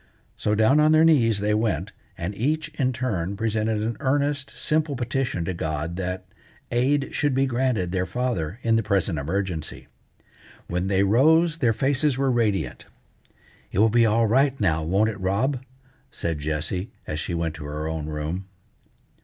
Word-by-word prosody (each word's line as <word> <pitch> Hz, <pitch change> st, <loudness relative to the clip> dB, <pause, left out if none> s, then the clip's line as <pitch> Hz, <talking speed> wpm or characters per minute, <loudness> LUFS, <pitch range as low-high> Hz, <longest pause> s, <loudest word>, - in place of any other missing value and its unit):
So 105 Hz, -, 0 dB
down 110 Hz, +7 st, +4 dB
on 155 Hz, +1 st, +5 dB
their 155 Hz, +1 st, +6 dB
knees 115 Hz, -10 st, +4 dB
they 105 Hz, +1 st, +1 dB
went, 105 Hz, -3 st, 0 dB, 0.3 s
and 85 Hz, +4 st, -3 dB
each 155 Hz, +9 st, -1 dB
in 135 Hz, -5 st, 0 dB
turn 100 Hz, -7 st, -2 dB
presented 110 Hz, -1 st, 0 dB
an 115 Hz, +1 st, -2 dB
earnest, 140 Hz, 0 st, 0 dB
simple 155 Hz, -2 st, 0 dB
petition 120 Hz, -7 st, -2 dB
to 95 Hz, -, -2 dB
God 80 Hz, 0 st, -3 dB
that 95 Hz, 0 st, -3 dB, 0.5 s
aid 135 Hz, +4 st, +1 dB
should 145 Hz, -3 st, +1 dB
be 135 Hz, +1 st, +3 dB
granted 120 Hz, -8 st, 0 dB
their 95 Hz, 0 st, -1 dB
father 105 Hz, -5 st, -2 dB
in 115 Hz, -1 st, +3 dB
the -, -, +2 dB
present 100 Hz, -6 st, 0 dB
emergency. 85 Hz, +1 st, -3 dB, 0.8 s
When 90 Hz, +2 st, -2 dB
they 95 Hz, 0 st, +2 dB
rose 155 Hz, -, +4 dB
their 120 Hz, -6 st, +3 dB
faces 135 Hz, +3 st, +1 dB
were 135 Hz, -1 st, +2 dB
radiant. 110 Hz, -5 st, 0 dB, 0.9 s
"It -, -, -5 dB
will 110 Hz, +3 st, +5 dB
be 115 Hz, 0 st, +4 dB
all 115 Hz, +2 st, +3 dB
right 135 Hz, +4 st, +2 dB
now, 80 Hz, -7 st, +2 dB
won't 95 Hz, +7 st, +2 dB
it, 105 Hz, -, -9 dB
Rob?" 115 Hz, +8 st, 0 dB, 0.5 s
said 80 Hz, -3 st, -3 dB
Jessie, 80 Hz, +7 st, -2 dB, 0.2 s
as 75 Hz, -, -3 dB
she 85 Hz, -, -3 dB
went 85 Hz, -1 st, -1 dB
to 80 Hz, -2 st, -8 dB
her 75 Hz, +1 st, -4 dB
own 80 Hz, -1 st, -3 dB
room. 80 Hz, +5 st, -4 dB
110 Hz, 170 wpm, -24 LUFS, 90-130 Hz, 0.9 s, their